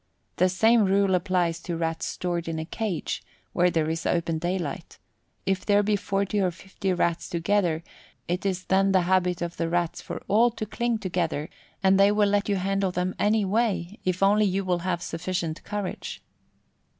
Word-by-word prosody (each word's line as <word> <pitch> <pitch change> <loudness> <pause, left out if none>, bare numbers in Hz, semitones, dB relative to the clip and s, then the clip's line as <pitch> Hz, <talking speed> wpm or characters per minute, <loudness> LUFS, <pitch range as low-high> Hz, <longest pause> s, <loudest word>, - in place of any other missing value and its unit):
The 185 +1 +4
same 220 +4 +4
rule 195 0 +3
applies 180 -2 +1
to 170 -1 -4
Rats 165 0 -2
stored 175 -2 -3
in 165 -1 -2
a 160 - -3
cage, 200 -1 -3 0.3
where 180 0 +3
there 160 -3 0
is 165 +1 -2
open 165 -2 0
daylight 175 -4 -3 0.5
if 190 0 0
there 205 0 +3
be 210 +1 +2
40 200 0 -1
or 185 - +2
50 190 +2 -4
Rats 170 -1 0
together, 170 -2 +1 0.4
it 180 +2 -1
is 185 -2 -1
then 195 +1 +3
the 185 - +5
habit 180 -1 +1
of 170 0 -5
the 165 -1 -1
Rats 175 -1 -1
for - - -7
all 230 +4 +5
to 230 -2 -5
cling 235 +2 -1
together, 170 -6 -2 0.3
and 190 0 +5
they 200 +1 +6
will 210 -1 +3
let 205 +1 +1
you 200 - +2
handle 195 +1 0
them 180 +1 -1
anyway 210 -2 +1
if 185 +1 0
only 210 +2 +5
you 195 0 0
will 180 -1 +1
have 175 -1 -2
sufficient 170 -1 -3
courage. 205 -3 -5
185 Hz, 180 wpm, -26 LUFS, 170-200 Hz, 0.5 s, they